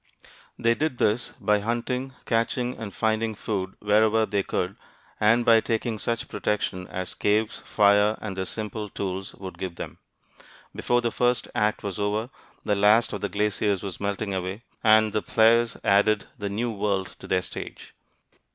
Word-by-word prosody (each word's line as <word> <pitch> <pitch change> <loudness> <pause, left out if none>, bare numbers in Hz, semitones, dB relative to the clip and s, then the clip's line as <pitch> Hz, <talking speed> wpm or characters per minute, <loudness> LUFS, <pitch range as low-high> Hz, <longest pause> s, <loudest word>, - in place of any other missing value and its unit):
They 115 0 +3
did 145 0 -1
this 110 +3 +1
by 105 -1 +2
hunting, 125 +4 -2
catching, 120 +2 0
and 110 -3 -6
finding 110 +1 0
food 95 -3 -3
wherever 110 +1 +3
they 100 -2 0
could, 90 0 -2 0.4
and 115 +3 +4
by 115 -1 +6
taking 110 -1 -2
such 115 +3 -2
protection 95 -3 -2
as 95 -1 -4
caves, 105 +2 +1
fire, 105 +1 +4
and 100 -3 -5
their 95 0 -2
simple 110 -1 -4
tools 95 0 -4
would 95 -1 -9
give 95 -3 -4
them. - - -7 0.8
Before 120 0 +1
the 120 -1 0
first 125 +1 +1
act 105 0 0
was 100 -1 -4
over, 105 +4 -1 0.3
the 105 - +1
last 105 +4 +4
of 100 - -4
the - - -1
glaciers 105 -1 0
was 95 -3 -5
melting 100 0 -2
away, 95 +4 -4 0.2
and 110 -1 +5
the 105 - +1
players 115 0 +4
had - - -16
added 100 +1 +3
the 100 -1 -4
New 115 +4 -1
World 100 -2 -1
to - - -10
their 90 -1 +1
stage. - - -8
105 Hz, 170 wpm, -26 LUFS, 100-115 Hz, 0.8 s, by